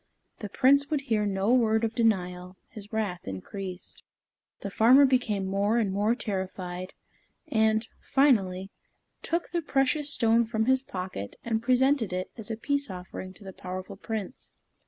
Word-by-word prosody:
The 210 Hz, -, -6 dB
Prince 280 Hz, +6 st, +4 dB
would 300 Hz, -3 st, 0 dB
hear 220 Hz, -6 st, 0 dB
no 195 Hz, +3 st, +1 dB
word 220 Hz, -3 st, +3 dB
of 225 Hz, 0 st, 0 dB
denial; 185 Hz, -5 st, 0 dB
his 210 Hz, -1 st, -10 dB
wrath 205 Hz, -5 st, -3 dB
increased. 180 Hz, -, -7 dB, 0.6 s
The 200 Hz, -, -5 dB
farmer 250 Hz, +7 st, +6 dB
became 245 Hz, -7 st, +1 dB
more 200 Hz, +4 st, +1 dB
and 215 Hz, -5 st, +1 dB
more 210 Hz, +4 st, +2 dB
terrified, 185 Hz, -4 st, -5 dB, 0.5 s
and, 220 Hz, 0 st, +2 dB
finally, 195 Hz, -9 st, +2 dB, 0.5 s
took 340 Hz, +1 st, -2 dB
the 340 Hz, -1 st, 0 dB
precious 285 Hz, 0 st, +1 dB
stone 230 Hz, -1 st, +3 dB
from 220 Hz, -1 st, 0 dB
his 260 Hz, +1 st, +3 dB
pocket 185 Hz, -, -6 dB
and 225 Hz, -1 st, -1 dB
presented 255 Hz, -3 st, +2 dB
it 185 Hz, 0 st, -3 dB
as 225 Hz, -3 st, -8 dB
a 225 Hz, -, -3 dB
peace 280 Hz, +3 st, -1 dB
offering 185 Hz, 0 st, -7 dB
to 205 Hz, -, -15 dB
the 190 Hz, -1 st, -9 dB
powerful 185 Hz, +1 st, -7 dB
Prince. 220 Hz, +3 st, -6 dB
220 Hz, 155 wpm, -28 LUFS, 190-250 Hz, 0.6 s, farmer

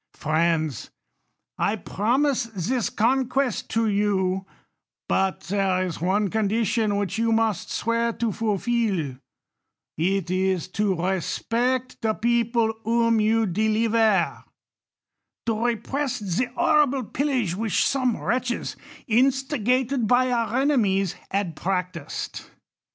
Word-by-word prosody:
Friends, 155 Hz, -3 st, 0 dB, 0.7 s
I 205 Hz, -, +1 dB
promise 240 Hz, +7 st, 0 dB
this 225 Hz, +3 st, -2 dB
conquest 255 Hz, +1 st, 0 dB
to 225 Hz, 0 st, +1 dB
you; 195 Hz, -2 st, 0 dB, 0.6 s
but 190 Hz, -1 st, 0 dB
there 190 Hz, -1 st, 0 dB
is 170 Hz, -4 st, -5 dB
one 195 Hz, +3 st, +1 dB
condition 220 Hz, 0 st, +1 dB
which 205 Hz, +1 st, -2 dB
you 230 Hz, 0 st, +2 dB
must 225 Hz, -4 st, +1 dB
swear 230 Hz, 0 st, 0 dB
to 230 Hz, -1 st, -1 dB
fulfil; 205 Hz, -, -1 dB, 0.8 s
it 185 Hz, +1 st, 0 dB
is 185 Hz, -2 st, 0 dB
to 205 Hz, 0 st, 0 dB
respect 230 Hz, +8 st, -1 dB
the 220 Hz, -2 st, 0 dB
people 235 Hz, -1 st, +1 dB
whom 230 Hz, 0 st, +2 dB
you 225 Hz, +1 st, +2 dB
deliver; 215 Hz, 0 st, +1 dB, 1.0 s
to 225 Hz, 0 st, 0 dB
repress 250 Hz, +4 st, -2 dB
the 200 Hz, +3 st, -1 dB
horrible 280 Hz, -3 st, +3 dB
pillage 255 Hz, -, -1 dB
which 220 Hz, 0 st, +1 dB
some 255 Hz, -4 st, +1 dB
wTetches, 245 Hz, 0 st, -2 dB, 0.3 s
instigated 255 Hz, 0 st, +1 dB
by 250 Hz, +2 st, +3 dB
our 235 Hz, 0 st, 0 dB
enemies, 205 Hz, -, +2 dB, 0.2 s
had 195 Hz, -5 st, -2 dB
practised. 180 Hz, -3 st, -4 dB
220 Hz, 105 wpm, -24 LUFS, 190-240 Hz, 1.0 s, horrible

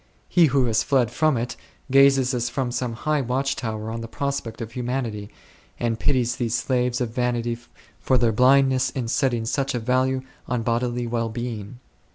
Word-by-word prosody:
He 170 Hz, -3 st, +5 dB
who 135 Hz, -2 st, +2 dB
has 115 Hz, -2 st, +2 dB
fled 125 Hz, -4 st, +2 dB
from 155 Hz, +2 st, +2 dB
it 120 Hz, +1 st, -3 dB, 0.4 s
gazes 135 Hz, -1 st, +5 dB
as 120 Hz, -1 st, -1 dB
from 125 Hz, -1 st, -2 dB
some 120 Hz, -1 st, -2 dB
high 150 Hz, +5 st, 0 dB
watch 135 Hz, +2 st, -1 dB
tower 110 Hz, -2 st, -4 dB
on 115 Hz, 0 st, -4 dB
the 115 Hz, -, -6 dB
prospect 140 Hz, -2 st, -3 dB
of 115 Hz, -1 st, -6 dB
humanity, 120 Hz, -4 st, -3 dB, 0.5 s
and 115 Hz, -1 st, -1 dB
pities 125 Hz, -3 st, +1 dB
these 120 Hz, -2 st, -1 dB
slaves 125 Hz, -1 st, 0 dB
of 120 Hz, -2 st, -1 dB
vanity 120 Hz, -1 st, 0 dB, 0.4 s
for 130 Hz, -, +2 dB
their 120 Hz, -1 st, +3 dB
blindness 130 Hz, +2 st, +4 dB
in 130 Hz, -2 st, -4 dB
setting 120 Hz, -2 st, 0 dB
such 135 Hz, +3 st, -1 dB
a -, -, 0 dB
value 130 Hz, +2 st, +1 dB, 0.2 s
on 120 Hz, -2 st, -1 dB
bodily 120 Hz, +1 st, -1 dB
well 115 Hz, -1 st, -1 dB
being. 120 Hz, -1 st, -5 dB
125 Hz, 180 wpm, -24 LUFS, 115-130 Hz, 0.5 s, He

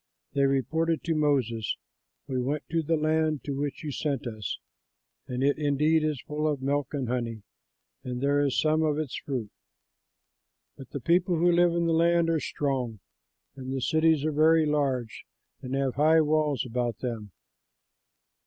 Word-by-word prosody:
They 140 Hz, -, +3 dB
reported 160 Hz, +5 st, 0 dB
to 165 Hz, -, 0 dB
Moses, 130 Hz, -8 st, 0 dB, 0.5 s
"We 130 Hz, -1 st, -1 dB
went 145 Hz, +4 st, -2 dB
to 165 Hz, 0 st, +1 dB
the 160 Hz, +1 st, 0 dB
land 155 Hz, -2 st, +1 dB
to 140 Hz, -, -3 dB
which 140 Hz, +2 st, -3 dB
you 150 Hz, -, -3 dB
sent 140 Hz, -1 st, -2 dB
us; 110 Hz, -3 st, -4 dB, 0.7 s
and 125 Hz, +1 st, -2 dB
it 145 Hz, +2 st, +2 dB
indeed 150 Hz, +2 st, +2 dB
is 155 Hz, -3 st, -1 dB
full 150 Hz, +1 st, -2 dB
of 150 Hz, -3 st, 0 dB
milk 140 Hz, +2 st, -1 dB
and 135 Hz, -3 st, -2 dB
honey; 115 Hz, -3 st, -3 dB, 0.6 s
and 125 Hz, -1 st, -4 dB
this 145 Hz, +1 st, +2 dB
is -, -, +2 dB
some 155 Hz, 0 st, +2 dB
of 150 Hz, -2 st, +1 dB
its 155 Hz, -4 st, -3 dB
fruit. 125 Hz, -7 st, -4 dB, 1.2 s
But 135 Hz, -, -12 dB
the 140 Hz, -, -6 dB
people 175 Hz, +5 st, +2 dB
who 175 Hz, +2 st, +4 dB
live 175 Hz, 0 st, +4 dB
in 170 Hz, 0 st, +1 dB
the 165 Hz, -, +2 dB
land 170 Hz, 0 st, +3 dB
are 160 Hz, -, +1 dB
strong, 130 Hz, -8 st, -2 dB, 0.6 s
and 130 Hz, -1 st, -7 dB
the 135 Hz, -, -1 dB
cities 155 Hz, +2 st, +2 dB
are 155 Hz, -, +1 dB
very 160 Hz, +2 st, +4 dB
large 135 Hz, -6 st, -1 dB, 0.4 s
and 130 Hz, +1 st, -4 dB
have 135 Hz, -2 st, 0 dB
high 155 Hz, +3 st, +4 dB
walls 150 Hz, -3 st, +1 dB
about 120 Hz, -1 st, -2 dB
them." 115 Hz, -5 st, -4 dB
145 Hz, 170 wpm, -27 LUFS, 130-155 Hz, 1.2 s, who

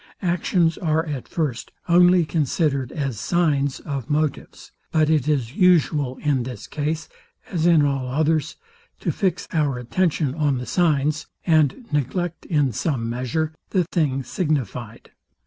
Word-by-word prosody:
Actions 170 Hz, -1 st, +1 dB
are 160 Hz, -1 st, +1 dB
at 145 Hz, -5 st, -5 dB
first 145 Hz, -8 st, -3 dB, 0.2 s
only 175 Hz, 0 st, +5 dB
considered 145 Hz, -4 st, 0 dB
as 135 Hz, -8 st, -3 dB
signs 145 Hz, -5 st, +1 dB
of 140 Hz, -5 st, -5 dB
motives: 150 Hz, -1 st, -2 dB, 0.2 s
But 155 Hz, -1 st, +3 dB
it 150 Hz, -3 st, +2 dB
is 135 Hz, -5 st, 0 dB
usual, 155 Hz, -8 st, +3 dB
in 145 Hz, -4 st, +2 dB
this 120 Hz, -3 st, -6 dB
case, 155 Hz, +2 st, -3 dB, 0.4 s
as 170 Hz, -3 st, +1 dB
in 160 Hz, -4 st, +5 dB
all 135 Hz, -2 st, -1 dB
others, 155 Hz, +3 st, 0 dB, 0.5 s
to -, -, 0 dB
fix 185 Hz, -3 st, -1 dB
our 145 Hz, -5 st, +1 dB
attention 150 Hz, +2 st, 0 dB
on 145 Hz, -3 st, +1 dB
the 125 Hz, -, -5 dB
signs, 150 Hz, -4 st, +1 dB, 0.2 s
and 160 Hz, -, +2 dB
neglect, 155 Hz, +5 st, -2 dB
in 145 Hz, -5 st, +2 dB
some 115 Hz, -3 st, -1 dB
measure, 130 Hz, +6 st, -2 dB, 0.2 s
the 185 Hz, -3 st, +2 dB
thing 150 Hz, -6 st, 0 dB
signifyed. 125 Hz, -, -3 dB
150 Hz, 140 wpm, -23 LUFS, 135-165 Hz, 0.5 s, only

